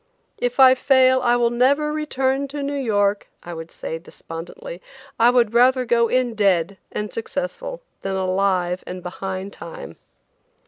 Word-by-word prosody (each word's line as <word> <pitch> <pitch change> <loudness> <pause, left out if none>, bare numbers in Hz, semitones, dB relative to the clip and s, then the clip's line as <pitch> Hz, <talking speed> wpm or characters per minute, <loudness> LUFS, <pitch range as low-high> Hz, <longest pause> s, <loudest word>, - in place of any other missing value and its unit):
"If 245 +2 -2
I 260 -1 +9
fail, 260 0 +4
I 240 -1 +3
will 240 -1 +2
never 280 +5 +2
return 275 -2 -1
to 285 +1 -5
New 280 +1 -2
York," 205 -7 0
I 175 - -7
would 165 0 -8
say 165 - -6
despondently; 180 - -9 0.4
"I 230 +1 +6
would 240 -3 +3
rather 255 +2 +4
go 235 0 +3
in 250 0 +1
dead 195 -3 +1
and 210 0 -4
successful 475 - -5 0.2
than 195 0 -3
alive 185 -1 0
and 180 0 -7
behind 190 +2 -5
time." 170 -1 -9
235 Hz, 150 wpm, -22 LUFS, 190-265 Hz, 0.4 s, I